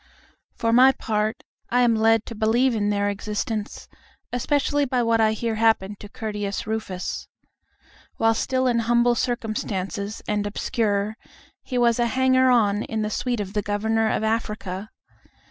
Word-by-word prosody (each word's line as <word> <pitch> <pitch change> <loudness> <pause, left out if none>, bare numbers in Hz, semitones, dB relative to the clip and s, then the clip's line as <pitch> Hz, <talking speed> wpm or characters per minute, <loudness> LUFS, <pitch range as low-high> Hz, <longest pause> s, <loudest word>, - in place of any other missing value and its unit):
For 230 -1 0
my 260 +2 +7
part, 215 -2 -2 0.3
I 245 +1 +3
am 240 -2 +4
led 225 0 +3
to - - -7
believe 230 +4 +2
in 205 -2 0
their 205 0 +1
existence, 210 +1 -4 0.5
especially 285 +3 +1
by 250 -2 0
what 230 -1 +2
I 220 0 +3
hear 230 +1 -2
happened 210 -3 +2
to 205 - -10
Curtius 210 -2 -4
Rufus. 215 -4 -4 0.9
While 225 0 +3
still 260 +3 0
in 240 -2 +2
humble 240 +1 +3
circumstances 215 -4 -3
and 205 -1 0
obscure, 210 0 -1 0.4
he 255 - -4
was 235 -1 +3
a 240 - +3
hanger 260 +1 +3
on 210 -4 +3
in 220 -1 -3
the 210 - -2
suite 245 +1 -1
of 200 -1 -4
the 210 - 0
Governor 220 +2 0
of - - -1
Africa. 215 -3 -2
220 Hz, 155 wpm, -24 LUFS, 210-240 Hz, 0.9 s, my